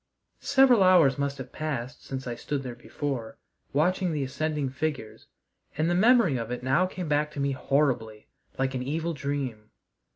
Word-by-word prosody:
Several 265 -5 +5
hours 170 -8 +5
must 140 0 -1
have 130 -1 -8
passed 140 -4 -4
since 130 -1 -6
I 120 - -3
stood 135 +4 -4
there 125 -2 -5
before, 125 0 -5 0.3
watching 180 +5 +1
the 150 -3 -1
ascending 145 +1 -2
figures, 135 -5 -4 0.5
and 160 +3 +1
the - - +2
memory 210 - +4
of 115 -1 -4
it 125 0 -4
now 140 +8 +2
came 185 -2 -6
back 150 0 +1
to 145 - -6
me 140 0 +1
horribly, 130 -6 0 0.3
like 135 0 0
an 130 - -2
evil 160 +6 -2
dream. 135 -7 -4
140 Hz, 170 wpm, -27 LUFS, 130-155 Hz, 0.5 s, Several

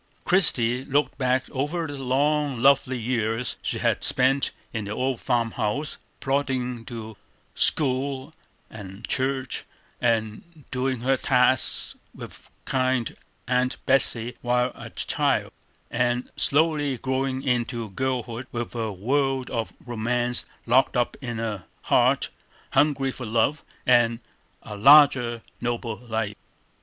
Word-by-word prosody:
Christie 125 -9 +2
looked 140 +1 0
back 130 0 +1
over 145 +5 -2
the 145 -3 -6
long, 140 +1 +1
lonely 135 0 +4
years 115 0 -1
she - - -2
had - - 0
spent 135 +2 +3 0.2
in 110 -3 -3
the 100 - -6
old 130 +1 -1
farm 120 -3 0
house, 135 +10 -2 0.2
plodding 130 -4 -1
to 110 -4 -7 0.4
school 135 0 +2 0.3
and 100 0 -9
church, 130 -1 -2 0.4
and 115 +7 -1
doing 130 -1 -1
her 135 +2 +2
tasks 130 -1 +2 0.2
with - - -11 0.2
kind 130 -3 0 0.3
Aunt 125 0 +1
Betsey 125 -3 +2
while 125 +1 +1
a - - -10
child; - - 0 0.4
and 120 +1 0
slowly 145 -2 +2
growing 130 +1 -2
into 120 -3 -1
girlhood, 125 +1 -3
with 120 -1 -4
a 115 -2 -2
world 130 +6 0
of 115 -2 -2
romance 120 +1 0 0.2
locked 125 +2 +3
up 120 - 0
in 120 -3 -4
a 110 -5 -4 0.2
heart - - +2 0.4
hungry 140 -3 +2
for 125 -2 -7
love 115 +7 +1 0.2
and 120 -2 +4 0.5
a 105 - -7
larger, 125 -1 +6 0.2
nobler 120 0 -4
life. 110 -2 -2
125 Hz, 125 wpm, -25 LUFS, 115-135 Hz, 0.5 s, larger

